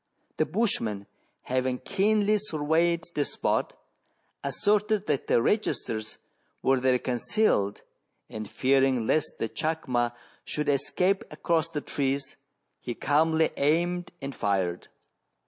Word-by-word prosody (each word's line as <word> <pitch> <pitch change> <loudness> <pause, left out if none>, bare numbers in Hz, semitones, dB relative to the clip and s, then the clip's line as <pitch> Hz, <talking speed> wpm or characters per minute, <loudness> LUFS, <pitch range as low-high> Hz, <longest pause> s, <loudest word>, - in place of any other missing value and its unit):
The 155 - +2
bushman, 115 - -1 0.4
having 130 0 0
keenly 210 +7 +2
surveyed 165 -1 +1
the 145 - +1
spot, - - -1 0.6
asserted 210 - +1
that 145 -3 -1
the 115 - +3
registers 120 - -1 0.5
were 135 -1 +3
there 130 0 +3
concealed, 125 - 0 0.4
and 110 -1 -7
fearing 135 -2 +2
lest 155 +6 +1
the - - -1
chacma 125 -5 -1 0.3
should 150 -1 -2
escape 180 +8 +1
across 165 -2 0
the 150 -3 -3
trees, 140 -1 -2 0.4
he 120 - -5
calmly 160 +2 +2
aimed 175 +4 +1
and 135 0 -4
fired. 95 -6 -1
145 Hz, 110 wpm, -27 LUFS, 125-175 Hz, 0.6 s, the